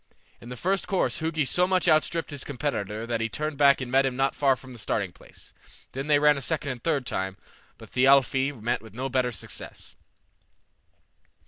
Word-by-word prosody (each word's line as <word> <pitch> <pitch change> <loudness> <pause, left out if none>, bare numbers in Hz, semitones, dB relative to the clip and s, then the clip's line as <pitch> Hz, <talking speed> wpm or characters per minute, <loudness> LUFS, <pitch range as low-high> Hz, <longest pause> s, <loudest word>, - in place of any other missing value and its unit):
In 120 - -11
the 125 - -6
first 190 +8 -1
course 190 - 0
Hugi 160 -2 0
so 180 +6 +2
much 185 -1 +1
out 155 0 +5
stripped 165 -2 -3
his 145 -2 -5
competitor 115 -6 -3
that 115 -1 -2
he 115 - -1
turned 150 +5 -4
back 140 -2 +5
and 125 -1 -5
met 135 +1 +4
him 135 -2 -1
not 135 +1 +1
far 135 -2 +3
from 130 0 -13
the 120 - -12
starting - - -2
place. - - -15 0.4
Then 135 +2 -5
they 150 -1 +5
ran 150 0 +4
a - - -4
second 145 0 -1
and 125 - -6
a - - -35
third 145 -4 0
time, 95 -3 -3 0.4
but - - -14
Thialfi 135 +1 +4
met 115 0 -1
with 110 -1 -14
no 130 +2 -3
better 125 -1 +1
success. - - -8
135 Hz, 210 wpm, -26 LUFS, 125-150 Hz, 0.4 s, out